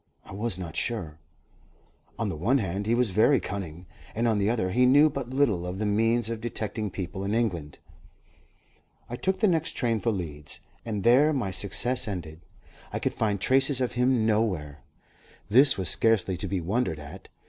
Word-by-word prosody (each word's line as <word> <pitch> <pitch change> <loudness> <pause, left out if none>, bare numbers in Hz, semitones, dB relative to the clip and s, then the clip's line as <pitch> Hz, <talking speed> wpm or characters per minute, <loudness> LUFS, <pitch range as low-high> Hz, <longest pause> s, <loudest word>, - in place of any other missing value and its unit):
I - - -13
was 105 0 0
not 85 -4 -7
sure. 85 -10 -2 1.0
On - - -2
the - - -3
one 110 - +1
hand, 100 -2 -3
he 115 - +2
was 120 -4 +1
very 115 +7 +4
cunning, 90 -3 -6 0.3
and, 115 +2 0
on 110 -3 +1
the 100 +1 +1
other, 110 -6 -1
he 125 +6 +3
knew 145 +4 +5
but 135 -3 -5
little 130 -10 +1
of 90 +1 -5
the 105 - -2
means 115 +2 +1
of 115 -1 -5
detecting 110 -2 -3
people 95 +1 -6
in 100 +2 -1
England. 85 -11 -2 1.3
I - - -3
took 190 +8 -2
the 215 - +4
next 165 -2 0
train 115 -3 -1
for 115 - -1
Leeds, 75 -7 -6 0.2
and 105 -4 -4
there 135 +6 +5
my 120 -9 -2
success 110 +6 +2
ended. 85 -5 -6 0.5
I - - -3
could - - -2
find 105 -3 -1
traces 135 +5 +2
of 125 -2 -1
him 125 -2 +1
nowhere. 95 -10 -1 0.7
This 130 +5 +5
was 95 -2 -1
scarcely 105 -1 +4
to 100 +2 -3
be 95 -1 -2
wondered 95 -1 -1
at. 75 -1 -11
110 Hz, 185 wpm, -26 LUFS, 95-120 Hz, 1.3 s, knew